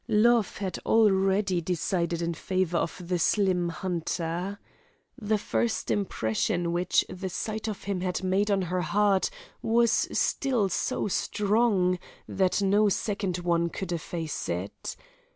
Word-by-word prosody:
Love 230 Hz, 0 st, +3 dB
had 190 Hz, -3 st, -3 dB
already 195 Hz, -3 st, +3 dB
decided 170 Hz, 0 st, -1 dB
in 170 Hz, 0 st, -1 dB
favour 180 Hz, 0 st, 0 dB
of 170 Hz, +1 st, -4 dB
the 180 Hz, -1 st, 0 dB
slim 180 Hz, -1 st, +2 dB
hunter. 175 Hz, +2 st, -3 dB, 0.6 s
The 215 Hz, 0 st, +1 dB
first 225 Hz, +2 st, -1 dB
impression 175 Hz, -, 0 dB
which 175 Hz, +1 st, +2 dB
the 190 Hz, +1 st, -5 dB
sight 215 Hz, +4 st, -4 dB
of 215 Hz, -2 st, -5 dB
him 195 Hz, -2 st, -2 dB
had 185 Hz, 0 st, -2 dB
made 190 Hz, +3 st, +1 dB
on 195 Hz, -2 st, +2 dB
her 180 Hz, +1 st, -1 dB
heart 200 Hz, +2 st, +2 dB, 0.3 s
was 230 Hz, 0 st, +3 dB, 0.2 s
still 245 Hz, -8 st, +1 dB
so 185 Hz, -, -1 dB
strong, 200 Hz, -2 st, +1 dB, 0.3 s
that 190 Hz, +1 st, +1 dB
no 205 Hz, +2 st, +4 dB
second 195 Hz, -2 st, -1 dB
one 170 Hz, -1 st, +1 dB
could 185 Hz, +1 st, -5 dB
efface 165 Hz, -1 st, -4 dB
it. 90 Hz, +4 st, -4 dB
190 Hz, 135 wpm, -27 LUFS, 175-205 Hz, 0.6 s, no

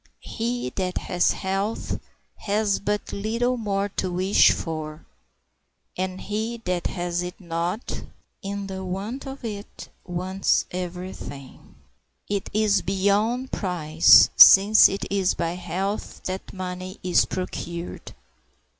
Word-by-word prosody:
He 235 Hz, -, -3 dB
that 185 Hz, -1 st, -1 dB
has 180 Hz, 0 st, +1 dB
health 195 Hz, +3 st, -3 dB, 0.4 s
has 205 Hz, -1 st, 0 dB
but 205 Hz, 0 st, -3 dB
little 230 Hz, +5 st, 0 dB
more 200 Hz, -4 st, -1 dB
to 185 Hz, -, -1 dB
wish 185 Hz, +3 st, +4 dB
for; 155 Hz, -2 st, -5 dB, 0.9 s
and 185 Hz, 0 st, -3 dB
he 220 Hz, +3 st, -3 dB
that 180 Hz, -1 st, -1 dB
has 175 Hz, -1 st, -2 dB
it 180 Hz, 0 st, -6 dB
not, 170 Hz, +4 st, -3 dB, 0.4 s
in 200 Hz, 0 st, -4 dB
the 190 Hz, -1 st, -6 dB
want 200 Hz, +9 st, -5 dB
of 270 Hz, -2 st, -8 dB
it 205 Hz, -2 st, -7 dB
wants 185 Hz, +2 st, 0 dB
every 180 Hz, +1 st, -5 dB
thing. 135 Hz, -2 st, -11 dB, 0.5 s
It 200 Hz, -1 st, -2 dB
is 210 Hz, -2 st, +2 dB
beyond 205 Hz, +7 st, 0 dB
price, 165 Hz, -4 st, +5 dB
since 205 Hz, +3 st, +9 dB
it 195 Hz, -, -4 dB
is 195 Hz, -2 st, +1 dB
by 170 Hz, -1 st, -1 dB
health 185 Hz, +4 st, -4 dB
that 185 Hz, +1 st, -5 dB
money 185 Hz, +1 st, -6 dB
is 180 Hz, -1 st, +3 dB
procured. 175 Hz, -2 st, -6 dB
190 Hz, 120 wpm, -24 LUFS, 180-205 Hz, 0.9 s, since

